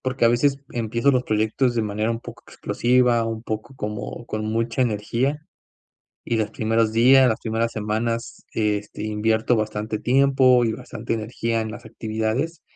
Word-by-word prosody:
porque 130 -2 -1
a - - +7
veces 135 +4 +2
empiezo 115 +3 +1
los 125 -2 +2
proyectos 110 +3 +1
de 115 - +1
manera 105 +1 -1
un 115 0 -3
poco - - -11
explosiva, 120 -1 +2
un 115 0 -4
poco 110 +4 -5
como 105 +1 -5
con 110 0 -3
mucha 115 +3 0
energía, 120 +5 0 0.9
y 115 - -1
los 110 -1 -1
primeros 110 0 +1
días, 130 +4 +6
las 110 -2 0
primeras 115 +1 -1
semanas, 110 +2 -3
este, 105 -1 -2
invierto 110 +2 +1
bastante 110 0 -2
tiempo 130 -1 +4
y 110 - 0
bastante 115 +1 -5
energía 115 +1 -2
en 110 - -4
las - - -10
actividades, 110 +9 -3
115 Hz, 160 wpm, -23 LUFS, 110-120 Hz, 0.9 s, a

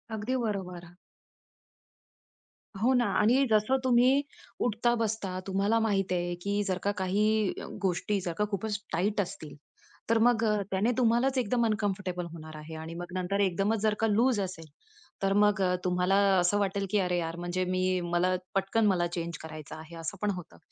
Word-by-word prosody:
अगदी 220 +5 -2
बरोबर. 180 -5 -4 1.9
हो 255 +3 +4
ना. 245 -1 +3
आणि 250 +6 +4
जसं 215 +5 +3
तुम्ही 255 +2 +4 0.4
उठता-बसता 220 -4 0
तुम्हाला 200 +4 +1
माहिती 195 -4 +1
आहे, 175 0 -1
की 200 +2 0
जर 190 -2 -1
का 205 - +2
काही 210 +2 +1 0.3
गोष्टी, 195 +2 0
जर 175 -2 -3
का 210 - +2
खूपच 205 +1 -2
टाईट 200 +5 +1
असतील, 155 -5 -7 0.5
तर 230 - +4
मग 240 -2 +3 0.3
त्याने 195 +5 +2
तुम्हालाच 250 +2 +2
एकदम 240 0 +1
अनकम्फर्टेबल 200 -5 -1
होणार 155 -1 -9
आहे. 155 +1 -9
आणि 160 +1 -7
मग 175 0 -8
नंतर 185 +2 -1
एकदमच 200 +3 +1
जर 215 -1 +2
का 225 - +2
लूज 225 +2 +3
असेल, 185 -4 -5 0.6
तर 195 0 +2
मग 205 0 +3
अ, 180 -1 +2
तुम्हाला 180 +1 +2 0.2
असं 180 +3 +2
वाटेल 200 0 0
की 210 - +3
अरे 180 -1 0
यार, 165 -1 -2
म्हणजे 175 +1 -2
मी 185 0 0
मला 175 +1 +1 0.2
पटकन 195 +3 +1
मला 175 -3 +2
चेंज 170 -2 -4
करायचं 155 -2 -8
आहे 160 +1 -11
असं 165 +4 -5
पण 210 - +1
होतं. 175 -1 -10
195 Hz, 165 wpm, -29 LUFS, 180-220 Hz, 1.9 s, हो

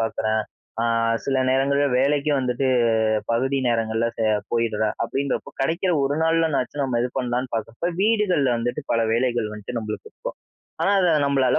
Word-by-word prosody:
பார்க்குறேன். 110 -1 0 0.4
ஆ - - +1 0.4
சில 135 -1 0
நேரங்கள்ல 140 +2 +2
வேலைக்கு 145 +2 +2
வந்துட்டு 125 0 0 0.7
பகுதி 135 +4 +1
நேரங்கள்ல 115 0 0
செய 110 -1 +2 0.2
போயிட்றேன், 110 -2 0
அப்பிடின்றப்போ 135 +4 -2
கிடைக்கிற 170 +6 0
ஒரு 140 +1 +1
நாள்னனாச்சும் 160 -4 +1
நம்ம 120 -3 0
இது 125 - 0
பண்ணலாம்ன்னு 125 0 -2
பார்க்குறப்போ, 115 +8 -3
வீடுகள்ல 200 - +2
வந்துட்டு 120 +5 -2
பல 115 - +2
வேலைகள் 120 -2 0
வந்துட்டு 105 +3 -7
நம்மளுக்கு 110 -1 -6
இருக்கும். - - -7 0.5
ஆனா 200 - +3
அத 180 -2 +3 0.2
நம்மளால 135 -2 +2
130 Hz, 145 wpm, -23 LUFS, 115-140 Hz, 0.7 s, ஆனா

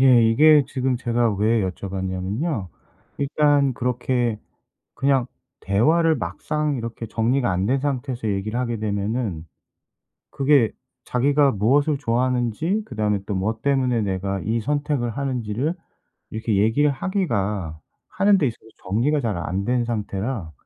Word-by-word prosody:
예 130 -3 +6
이게 145 +6 +6
지금 130 -1 -1
제가 120 -1 +1
왜 110 +1 +2
여쭤봤냐면요 95 - -3 0.5
일단 145 -1 +2
그렇게 125 -2 -1 0.6
그냥 135 -2 +2 0.4
대화를 160 - +3
막상 145 - -2
이렇게 115 -1 -5
정리가 120 +4 0
안 90 +1 0
된 135 +5 +2
상태에서 130 -3 -3
얘기를 105 +3 -2
하게 120 -2 -2
되면은 100 -4 -2 0.9
그게 135 -4 +3 0.3
자기가 140 +3 +3
무엇을 140 +8 +2
좋아하는지 125 - 0
그 125 - -10
다음에 105 -2 +1
또 105 - -2
뭐 110 +4 -1
때문에 130 -4 +1
내가 95 -1 -2
이 115 +4 -1
선택을 145 -1 -1
하는지를 130 +3 -2 0.6
이렇게 110 -1 -1
얘기를 115 +9 +3
하기가 105 - -2 0.3
하는 195 +1 +3
데 145 - +2
있어서 115 - -5 0.3
정리가 130 +10 +2
잘 110 -7 -1
안 95 +3 -2
된 120 +2 0
상태라 105 -4 -3
120 Hz, 295 characters per minute, -23 LUFS, 105-140 Hz, 0.9 s, 예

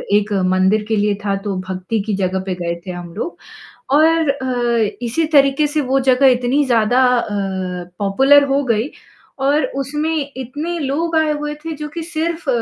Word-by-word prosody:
एक 210 0 +1 0.2
मंदिर 190 +3 +2
के 225 - 0
लिए 205 -1 +1
था, 200 -1 +1
तो 195 -1 -4
भक्ति 185 +4 -3
की 210 -3 -1
जगह 190 -1 -1
पे 185 -2 -2
गए 170 - -1
थे - - -3
हम 175 -1 -8
लोग 335 - -5 0.6
और 320 -1 +4
अ, 240 -5 0
इसी 245 +8 0
तरीके 275 0 +4
से 300 +1 -1
वो 270 0 +1
जगह 260 +2 +4
इतनी 250 +4 +1
ज़्यादा 245 0 +3
अ, 235 - -1 0.7
पॉपुलर 270 +9 +4
हो 275 +1 +2
गई 230 +2 0 0.5
और 280 +3 +2
उसमें 295 +1 -2
इतने 295 +7 -4
लोग 320 +4 -2
आए 315 -1 +3
हुए 295 0 -3
थे 325 - -4
जो 300 0 -6
कि 330 +3 -6
सिर्फ़ 330 -1 -3
265 Hz, 175 wpm, -18 LUFS, 210-300 Hz, 0.7 s, और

